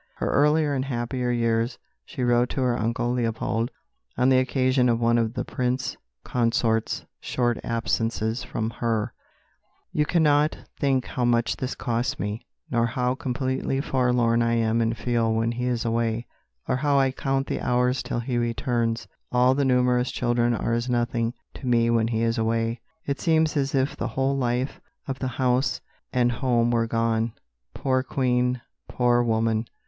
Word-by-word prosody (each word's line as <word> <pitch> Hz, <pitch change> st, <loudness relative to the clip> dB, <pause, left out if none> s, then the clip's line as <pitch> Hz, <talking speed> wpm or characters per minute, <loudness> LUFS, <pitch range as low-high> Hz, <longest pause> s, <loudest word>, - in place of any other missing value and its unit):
In -, -, -1 dB
earlier 150 Hz, +1 st, +3 dB
and 130 Hz, -1 st, -1 dB
happier 125 Hz, -1 st, -2 dB
years 115 Hz, 0 st, +1 dB, 0.3 s
she 135 Hz, -6 st, -5 dB
wrote 120 Hz, 0 st, +3 dB
to 135 Hz, -, -2 dB
her 125 Hz, -1 st, +2 dB
uncle 115 Hz, +1 st, -1 dB
Leopold 115 Hz, -1 st, -1 dB, 0.5 s
on 125 Hz, +2 st, +4 dB
the 130 Hz, -1 st, +5 dB
occasion 130 Hz, -1 st, +2 dB
of 115 Hz, -1 st, +2 dB
one 120 Hz, 0 st, +3 dB
of 115 Hz, +1 st, -1 dB
the 125 Hz, 0 st, -2 dB
Prince 125 Hz, 0 st, -2 dB, 0.3 s
Consort's 115 Hz, -2 st, 0 dB
short 120 Hz, -2 st, 0 dB
absences 115 Hz, 0 st, -1 dB
from 110 Hz, 0 st, -3 dB
her: 115 Hz, -1 st, -1 dB, 0.8 s
"You 150 Hz, -1 st, +1 dB
cannot 150 Hz, -2 st, +3 dB, 0.2 s
think 135 Hz, -3 st, +1 dB
how 125 Hz, -, -3 dB
much 120 Hz, -1 st, +2 dB
this 130 Hz, 0 st, -3 dB
costs 125 Hz, +3 st, -1 dB
me, 105 Hz, +2 st, -4 dB, 0.2 s
nor 120 Hz, -1 st, +2 dB
how 125 Hz, +1 st, 0 dB
completely 130 Hz, +1 st, -2 dB
forlorn 125 Hz, -4 st, +2 dB
I 115 Hz, 0 st, +2 dB
am 115 Hz, 0 st, +2 dB
and 115 Hz, 0 st, 0 dB
feel 115 Hz, 0 st, +1 dB
when 115 Hz, +1 st, +1 dB
he 125 Hz, +1 st, -3 dB
is 120 Hz, -2 st, -1 dB
away, 115 Hz, 0 st, 0 dB, 0.4 s
or -, -, +1 dB
how 145 Hz, +1 st, +2 dB
I 135 Hz, -1 st, +3 dB
count 135 Hz, +1 st, -1 dB
the -, -, -3 dB
hours 125 Hz, +1 st, +1 dB
till 120 Hz, -, -3 dB
he 120 Hz, 0 st, -1 dB
returns. 115 Hz, -1 st, -1 dB, 0.2 s
All 125 Hz, +1 st, +4 dB
the 140 Hz, +1 st, +1 dB
numerous 125 Hz, -1 st, +2 dB
children 120 Hz, -1 st, +1 dB
are 115 Hz, -, -1 dB
as 120 Hz, +2 st, -1 dB
nothing 120 Hz, -1 st, 0 dB, 0.2 s
to 130 Hz, -, -8 dB
me 115 Hz, -1 st, +3 dB
when 115 Hz, -1 st, +2 dB
he 115 Hz, -1 st, 0 dB
is 115 Hz, +1 st, +1 dB
away. 115 Hz, +1 st, 0 dB, 0.2 s
It 140 Hz, 0 st, -2 dB
seems 160 Hz, -2 st, +2 dB
as 140 Hz, -1 st, 0 dB
if 135 Hz, +3 st, +1 dB
the -, -, -3 dB
whole 135 Hz, +3 st, 0 dB
life 125 Hz, 0 st, -1 dB, 0.3 s
of 135 Hz, -1 st, -4 dB
the 130 Hz, -, -1 dB
house 130 Hz, 0 st, +1 dB, 0.3 s
and 120 Hz, -1 st, +2 dB
home 120 Hz, -1 st, +1 dB
were 115 Hz, -1 st, +1 dB
gone." 115 Hz, 0 st, 0 dB, 0.4 s
Poor 130 Hz, -1 st, +1 dB
Queen, 125 Hz, -1 st, 0 dB, 0.3 s
poor 120 Hz, -1 st, +3 dB
woman! 115 Hz, -1 st, +1 dB
120 Hz, 170 wpm, -25 LUFS, 115-130 Hz, 0.8 s, the